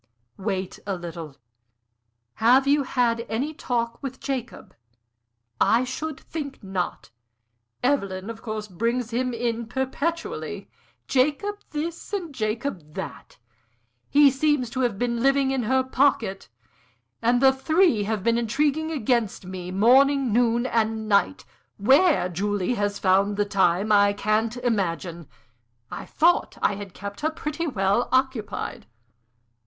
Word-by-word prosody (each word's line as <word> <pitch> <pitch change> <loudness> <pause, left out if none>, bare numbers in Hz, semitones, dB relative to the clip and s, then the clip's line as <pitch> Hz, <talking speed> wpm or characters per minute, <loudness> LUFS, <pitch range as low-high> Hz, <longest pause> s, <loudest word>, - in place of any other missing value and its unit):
"Wait 190 -2 -3
a 195 - -1
little. 165 -4 -8 1.0
Have 250 +5 +5
you 285 +1 +3
had 240 -3 0
any 260 +8 -2
talk 235 -4 -2
with 265 -2 -6
Jacob?" 260 -4 -5 0.9
"I 235 +3 +4
should 280 +4 -5
think 280 -7 -7
not! 190 -9 -4 0.7
Evelyn, 200 -8 0
of 225 -1 -7
course, 215 -2 -5
brings 230 +5 -2
him 250 +2 0
in 235 -1 -2
perpetually 275 +7 -3 0.4
Jacob 300 +11 +1
this 330 +5 -5
and 350 -7 -3
Jacob 215 - -3
that. - - -7 0.7
He 285 0 +6
seems 270 -3 +1
to 260 - -4
have 240 -6 0
been 235 +1 -1
living 275 +1 +3
in 265 -1 0
her 260 0 +3
pocket, 260 -7 +1 0.7
and 240 +1 +3
the 265 +1 +6
three 310 - +2
have 215 -2 -2
been 230 +1 +2
intriguing 290 +7 0
against 235 - -1
me, 185 -1 -6
morning, 255 +5 +4
noon, 235 +1 +2
and 220 -2 0
night. 205 +6 +2 0.3
Where 270 - +4
Julie 200 +4 -1
has 205 -2 -1
found 195 +2 +2
the 205 - +2
time 195 0 +2
I 205 -1 +5
can't 215 +3 0
imagine; 180 - -2 0.6
I - - -7
thought 345 +2 +2
I - - +2
had 200 -2 -8
kept 200 0 -7
her 310 - +1
pretty 315 +1 -4
well 200 -3 +1
occupied." 260 - -1
235 Hz, 130 wpm, -25 LUFS, 205-270 Hz, 1.0 s, He